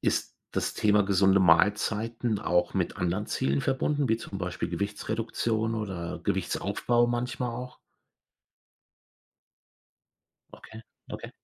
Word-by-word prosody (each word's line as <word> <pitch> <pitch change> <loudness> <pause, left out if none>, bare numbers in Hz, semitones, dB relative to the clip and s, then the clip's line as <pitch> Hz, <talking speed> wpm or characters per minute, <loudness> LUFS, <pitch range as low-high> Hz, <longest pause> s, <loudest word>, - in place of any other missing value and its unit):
ist - - 0 0.2
das - - -1
Thema 105 -1 +3
gesunde 95 0 +4
Mahlzeiten 105 +6 +2
auch 90 -4 +1
mit - - -1
anderen 95 +4 -1
Zielen 70 +1 0
verbunden, 140 - 0
wie 110 - +3
zum 100 -3 -7
Beispiel 90 -2 -3
Gewichtsreduktion 110 +3 -1
oder 95 -6 -4
Gewichtsaufbau 120 0 +1
manchmal 120 0 -2
auch? 125 +1 -7 2.8
Okay, 110 - -12 0.3
okay. - - -6
105 Hz, 105 wpm, -28 LUFS, 95-115 Hz, 2.8 s, gesunde